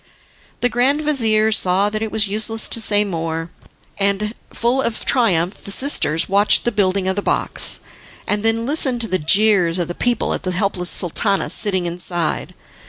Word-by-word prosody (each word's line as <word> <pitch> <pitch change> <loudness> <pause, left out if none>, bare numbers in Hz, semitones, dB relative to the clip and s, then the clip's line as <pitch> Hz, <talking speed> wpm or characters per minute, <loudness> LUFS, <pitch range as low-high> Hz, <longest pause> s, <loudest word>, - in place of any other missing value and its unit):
The 245 - +3
grand 255 +5 +1
vizir 220 -7 +2
saw 195 0 +2
that 215 0 -4
it 220 -1 -3
was 215 -2 +2
useless 220 +2 0
to 230 - +2
say 210 -1 +2
more, 165 -3 -4 0.5
and, 200 +2 0 0.2
full 245 +3 0
of 235 -4 -3
triumph, 190 -8 +1
the - - -9
sisters 200 - +1
watched 200 +2 +3
the 240 - +1
building 195 -2 0
of 190 - 0
the 205 - -2
box, - - -2 0.4
and 205 0 -1
then 225 +1 0
listened 265 -4 0
to 225 - +3
the 185 -2 -1
jeers 180 +1 +3
of 175 -2 -2
the 175 - -5
people 245 +6 -1
at - - -4
the 185 -1 -3
helpless 180 -1 -2
Sultana 195 +3 +1
sitting 190 -4 +1
inside. 175 -1 -2
205 Hz, 175 wpm, -19 LUFS, 180-225 Hz, 0.5 s, The